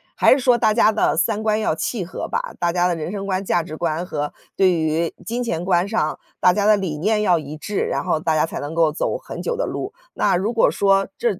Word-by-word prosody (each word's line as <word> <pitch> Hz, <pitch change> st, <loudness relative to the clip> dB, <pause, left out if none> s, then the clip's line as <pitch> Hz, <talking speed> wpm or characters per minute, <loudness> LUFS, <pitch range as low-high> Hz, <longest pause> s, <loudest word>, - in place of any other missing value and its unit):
还 -, -, +4 dB
是 265 Hz, -, +5 dB
说 245 Hz, -2 st, +4 dB
大 220 Hz, -2 st, +3 dB
家 220 Hz, -1 st, +4 dB
的 215 Hz, -, +1 dB
三 210 Hz, +5 st, 0 dB
观 215 Hz, 0 st, +1 dB
要 215 Hz, -, 0 dB
契 205 Hz, +4 st, -2 dB
合 175 Hz, -, -6 dB
吧。 -, -, -4 dB
大 170 Hz, -1 st, +1 dB
家 175 Hz, 0 st, +2 dB
的 175 Hz, -, 0 dB
人 165 Hz, +1 st, -5 dB
生 200 Hz, -1 st, -5 dB
观、 190 Hz, 0 st, -1 dB
价 175 Hz, -, +2 dB
值 155 Hz, -1 st, -8 dB
观 165 Hz, 0 st, -1 dB
和 150 Hz, -5 st, -4 dB, 0.2 s
对 190 Hz, -1 st, +4 dB
于 160 Hz, 0 st, 0 dB
金 240 Hz, +2 st, -3 dB
钱 170 Hz, -8 st, -2 dB
观 180 Hz, 0 st, +2 dB
上， 200 Hz, -8 st, -1 dB, 0.2 s
大 180 Hz, -, +5 dB
家 205 Hz, +2 st, 0 dB
的 215 Hz, 0 st, +6 dB
理 185 Hz, -7 st, -3 dB
念 210 Hz, +7 st, +1 dB
要 185 Hz, -4 st, +3 dB
一 150 Hz, -1 st, -6 dB
致， 195 Hz, +6 st, -3 dB
然 -, -, -1 dB
后 175 Hz, -4 st, 0 dB
大 160 Hz, 0 st, 0 dB
家 155 Hz, -, +2 dB
才 -, -, -6 dB
能 145 Hz, +2 st, -5 dB
够 165 Hz, -2 st, +3 dB
走 150 Hz, -, -2 dB
很 -, -, -7 dB
久 480 Hz, -, -1 dB
的 -, -, -2 dB
路。 400 Hz, -, -5 dB, 0.2 s
那 -, -, +2 dB
如 195 Hz, +6 st, 0 dB
果 230 Hz, -, +3 dB
说 195 Hz, -1 st, +2 dB
这 215 Hz, -6 st, 0 dB
185 Hz, 280 characters per minute, -21 LUFS, 165-215 Hz, 0.2 s, 的